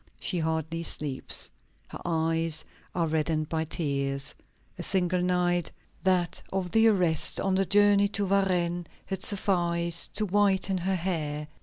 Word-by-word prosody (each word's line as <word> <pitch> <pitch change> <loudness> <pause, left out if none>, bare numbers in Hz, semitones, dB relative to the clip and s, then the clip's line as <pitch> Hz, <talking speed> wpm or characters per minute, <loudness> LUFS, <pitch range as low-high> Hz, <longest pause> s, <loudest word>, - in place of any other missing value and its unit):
She 180 - -1
hardly 160 0 -2
sleeps. 145 -5 +2 0.4
Her - - -9
eyes 165 -1 -1 0.3
are 170 -2 +1
reddened 155 -1 -1
by 160 0 -1
tears. 140 -3 -2 0.5
A - - -2
single 180 -1 +1
night, 175 -1 +1 0.3
that 180 -2 +1
of 190 -2 -2
the 225 +1 +5
arrest 180 -7 +2
on 195 - 0
the 195 +1 +2
journey 205 0 +4
to 200 0 -2
Varennes, 180 -3 +1 0.2
had 190 -1 -4
sufficed 170 -4 +1
to 215 +1 +1
whiten 195 -1 +2
her 190 +2 0
hair. 155 -5 -2
175 Hz, 140 wpm, -27 LUFS, 160-190 Hz, 0.5 s, the